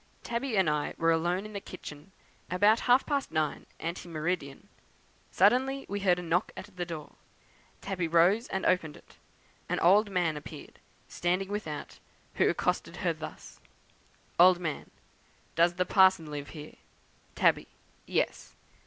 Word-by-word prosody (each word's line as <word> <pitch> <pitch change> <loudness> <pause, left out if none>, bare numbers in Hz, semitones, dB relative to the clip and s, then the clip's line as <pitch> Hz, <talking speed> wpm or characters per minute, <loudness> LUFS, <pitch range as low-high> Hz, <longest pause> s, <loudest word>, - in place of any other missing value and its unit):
Tabby 235 -1 -2
and 190 -3 +3
I 150 -1 -1
were 165 0 +3
alone 175 +4 0
in 215 - -9
the 200 - -3
kitchen, 155 -1 -10 0.4
about 205 +5 +4
half 250 +2 +5
past 280 -2 -1
nine 155 -2 -2
ante 170 +1 -5
meridian. 160 -1 -3 0.6
Suddenly 270 +2 +2
we 200 +1 -3
heard 185 -3 +3
a 180 - -5
knock 170 +2 0
at 205 - -10
the 175 -1 -4
door; 160 -3 -8 0.6
Tabby 185 -3 -2
rose 175 +8 +3
and 190 - -3
opened 165 -5 +1
it. - - -20 0.5
An - - 0
old 205 +5 +5
man 175 -5 0
appeared, 150 - -11 0.3
standing 180 +2 -1
without, 180 -8 -5 0.3
who - - +3
accosted - - -1
her - - +2
thus: - - -10 0.8
"Old 180 0 +7
Man. 160 -4 -4 0.6
'Does 170 +1 +3
the 180 0 0
parson 185 -5 +4
live 145 -1 -6
here?' 150 -1 -10 0.6
"Tabby. - - +3 0.4
'Yes.' - - -2
180 Hz, 145 wpm, -29 LUFS, 165-200 Hz, 0.8 s, Old